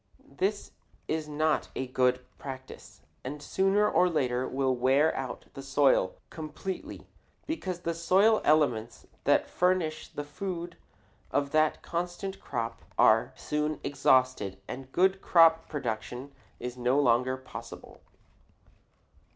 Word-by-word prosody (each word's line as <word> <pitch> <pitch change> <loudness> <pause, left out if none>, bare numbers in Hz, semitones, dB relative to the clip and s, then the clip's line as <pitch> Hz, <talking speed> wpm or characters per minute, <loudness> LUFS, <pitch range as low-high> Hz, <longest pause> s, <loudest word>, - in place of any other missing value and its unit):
This 200 +4 -1 0.4
is 155 -1 -2
not 155 +1 0
a 130 - -2
good 125 0 +1
practice 130 - -9 0.2
and 145 +4 -5
sooner 195 +7 +2
or 180 -3 +3
later 130 -5 0
will 130 -1 0
wear 135 +5 +3
out 135 -1 -5
the 135 - -7
soil 135 -8 +2 0.2
completely, 160 +4 -6 0.4
because 185 - -4
the 170 -1 -1
soil 190 +6 +4
elements 125 -7 +1 0.2
that - - +3
furnish 180 -4 0
the 145 - -6
food 175 +3 -5 0.5
of 140 0 0
that 155 0 +2
constant 175 +3 -4
crop 115 -1 -4 0.2
are - - +5
soon 150 0 -2
exhausted 130 -8 +2
and 130 +1 -7
good 190 +3 +2
crop 165 -1 +5
production 130 -1 -4 0.3
is 125 0 -5
no 125 +3 +2
longer 130 0 +3
possible. 130 - -10
145 Hz, 120 wpm, -29 LUFS, 130-170 Hz, 0.5 s, are